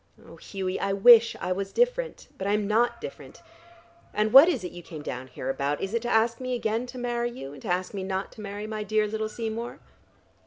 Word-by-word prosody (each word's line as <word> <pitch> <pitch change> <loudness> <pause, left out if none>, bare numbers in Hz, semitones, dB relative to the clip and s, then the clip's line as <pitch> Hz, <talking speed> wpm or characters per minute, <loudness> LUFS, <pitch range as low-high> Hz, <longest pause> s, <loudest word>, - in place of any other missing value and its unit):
Oh, - - -13
Hughie, 190 -2 -4
I 195 - 0
wish 230 +3 +7
I 180 - -3
was 195 +1 -2
different. - - 0
But 195 - -4
I 200 - +2
am 210 -1 0
not 230 +3 +2
different. - - -10 0.7
And 215 +1 +1
what 280 +6 +10
is 260 - -1
it 180 - -5
you 175 - -9
came 160 -3 -9
down 130 -2 -5
here 130 0 -7
about? 140 +2 -1
Is 195 +2 -4
it 230 - 0
to 240 - -3
ask 230 0 +2
me 255 -1 -2
again 230 +1 -1
to 250 +1 -9
marry 240 -1 -1
you, 140 - -8
and 140 - -12
to - - -8
ask 180 +2 -1
me 195 -2 -4
not 190 +1 -3
to 220 - -11
marry 205 0 -6
my 215 0 -4
dear 215 +1 +1
little 215 +1 -3
Seymour?" 230 +1 -5
215 Hz, 235 wpm, -27 LUFS, 190-240 Hz, 0.7 s, what